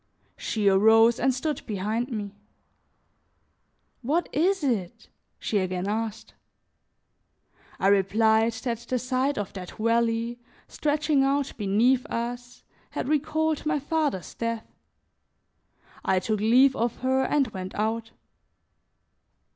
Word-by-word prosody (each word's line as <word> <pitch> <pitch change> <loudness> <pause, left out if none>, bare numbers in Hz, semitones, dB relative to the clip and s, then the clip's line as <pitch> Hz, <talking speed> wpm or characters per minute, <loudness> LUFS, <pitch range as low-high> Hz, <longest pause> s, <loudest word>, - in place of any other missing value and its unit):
She 210 -3 -1
arose 220 +4 +5
and 265 - +3
stood 290 +4 -3
behind 215 +3 -2
me. 205 -4 -5 1.7
"What 300 +8 0
is 365 +4 +1
it?" 215 -10 -2 0.3
she 210 - -1
again 185 0 -2
asked. 220 +1 -3 1.5
I - - -1
replied 220 +3 +3
that 230 0 -3
the 235 +2 -3
sight 255 +3 -1
of 205 -2 -4
that 185 -2 -8
valley, 230 +1 0 0.3
stretching 300 -1 +1
out 275 0 0
beneath 230 +6 +2
us, 245 +1 -5 0.3
had - - -4
recalled 310 +1 0
my 310 -1 +2
father's 290 - -2
death; 230 -1 -3 1.4
I 190 - +2
took 215 +3 -1
leave 255 +5 +5
of 235 0 -1
her 260 0 +2
and 275 -4 +1
went 185 -2 -7
out. 225 +2 -1
230 Hz, 115 wpm, -26 LUFS, 215-270 Hz, 1.7 s, arose